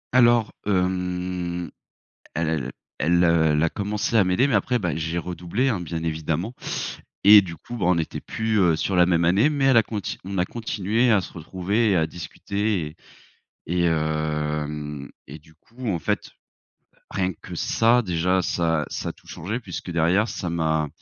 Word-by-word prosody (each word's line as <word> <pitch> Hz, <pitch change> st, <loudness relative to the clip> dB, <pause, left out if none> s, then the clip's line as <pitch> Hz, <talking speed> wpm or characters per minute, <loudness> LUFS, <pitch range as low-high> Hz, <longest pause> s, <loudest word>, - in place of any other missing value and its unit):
Alors 120 Hz, -3 st, +5 dB, 0.2 s
hem, 90 Hz, -2 st, -1 dB, 0.7 s
el 80 Hz, 0 st, 0 dB
el 70 Hz, -6 st, -1 dB, 0.3 s
elle, 85 Hz, +4 st, +3 dB
heu, 85 Hz, -1 st, +4 dB
elle 75 Hz, -, +2 dB
a 85 Hz, -, +3 dB
commencé 105 Hz, +2 st, -1 dB
à 110 Hz, -, +6 dB
m'aider 90 Hz, +9 st, +3 dB
mais 140 Hz, -, 0 dB
après, 125 Hz, +5 st, +2 dB
bah, 90 Hz, -8 st, -1 dB
j'ai 80 Hz, +2 st, -2 dB
redoublé, 90 Hz, +9 st, -2 dB
hein, 105 Hz, -8 st, 0 dB
bien 85 Hz, -1 st, -4 dB
évidemment 80 Hz, +7 st, -2 dB, 0.7 s
et 105 Hz, 0 st, +10 dB
du 85 Hz, -3 st, -7 dB
coup, 120 Hz, -, -8 dB
ben, 95 Hz, -7 st, -1 dB
on 90 Hz, -, +4 dB
n'était 80 Hz, -1 st, -3 dB
plus, 110 Hz, -1 st, -1 dB
heu, 85 Hz, -4 st, +4 dB
sur 95 Hz, -, -1 dB
la 90 Hz, -, +6 dB
même 85 Hz, -2 st, +2 dB
année, 100 Hz, -, +4 dB
mais 140 Hz, -2 st, 0 dB
elle 135 Hz, -2 st, +5 dB
à -, -, +5 dB
conti 105 Hz, -3 st, -4 dB
on 95 Hz, 0 st, -4 dB
a 90 Hz, -, +3 dB
continué 110 Hz, +2 st, 0 dB
à 105 Hz, -3 st, +5 dB
se -, -, -9 dB
retrouver 95 Hz, +7 st, -1 dB
et -, -, +3 dB
à 80 Hz, -2 st, +2 dB
discuter 100 Hz, +3 st, -3 dB
et 75 Hz, +2 st, -10 dB, 0.8 s
et -, -, +3 dB
hem, 75 Hz, -2 st, -1 dB, 0.2 s
et 70 Hz, +4 st, -8 dB
du 80 Hz, +1 st, -22 dB
coup 115 Hz, +9 st, -9 dB
en 90 Hz, -, 0 dB
fait, -, -, -1 dB, 0.7 s
heu, -, -, -28 dB
rien 95 Hz, 0 st, 0 dB
que -, -, -8 dB
ça, 115 Hz, +2 st, +3 dB
déjà 90 Hz, -1 st, +1 dB
ça 80 Hz, -3 st, 0 dB
ça -, -, -3 dB
a -, -, -4 dB
tout -, -, -25 dB
changé 110 Hz, +9 st, -4 dB
puisque 90 Hz, -4 st, -7 dB
derrière 85 Hz, +6 st, +3 dB
ça 90 Hz, -, -4 dB
m'a 80 Hz, -2 st, 0 dB
90 Hz, 190 wpm, -24 LUFS, 80-105 Hz, 0.8 s, et